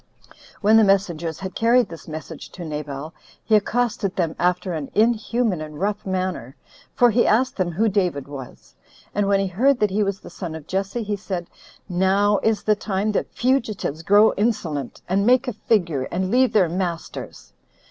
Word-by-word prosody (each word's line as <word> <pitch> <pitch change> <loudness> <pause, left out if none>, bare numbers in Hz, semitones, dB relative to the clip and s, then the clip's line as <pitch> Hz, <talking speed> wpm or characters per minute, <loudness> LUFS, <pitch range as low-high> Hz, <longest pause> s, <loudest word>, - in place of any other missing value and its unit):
When 215 +1 +5
the 220 - +6
messengers 175 -5 +1
had 190 -1 -5
carried 235 0 +3
this 165 -3 -11
message 155 0 -8
to 175 - -7
Nabal, 150 0 -5 0.3
he 220 - +3
accosted 210 -2 0
them 165 -3 -1
after 180 +1 0
an 155 -4 -4
inhuman 225 -3 +1
and 150 -1 -8
rough 205 +1 -2
manner; 185 -9 -3 0.4
for 245 -2 +5
he 235 +3 +3
asked 250 +4 +2
them 180 -3 -1
who 220 +7 +2
David 180 -9 0
was? 135 -3 -10 0.4
and 205 0 +1
when 200 0 +3
he 195 - +1
heard 245 +9 +2
that 210 -2 +2
he 205 +3 +1
was 195 -1 -1
the - - -11
son 170 -4 -6
of 160 -2 -9
Jesse, 195 +6 -2
he 210 0 -2
said, 190 -4 -5 0.4
"Now 195 +2 +2
is 220 -1 +1
the 215 - +3
time 205 0 -1
that 210 - -2
fugitives 230 - -1
grow 205 +5 +5
insolent, 180 - -2
and 195 +2 +1
make 255 +4 +4
a 250 - -1
figure, 170 - 0
and 185 +2 -1
leave 255 +1 +4
their 195 -5 +4
masters." 170 -1 -5
195 Hz, 180 wpm, -22 LUFS, 170-215 Hz, 0.4 s, the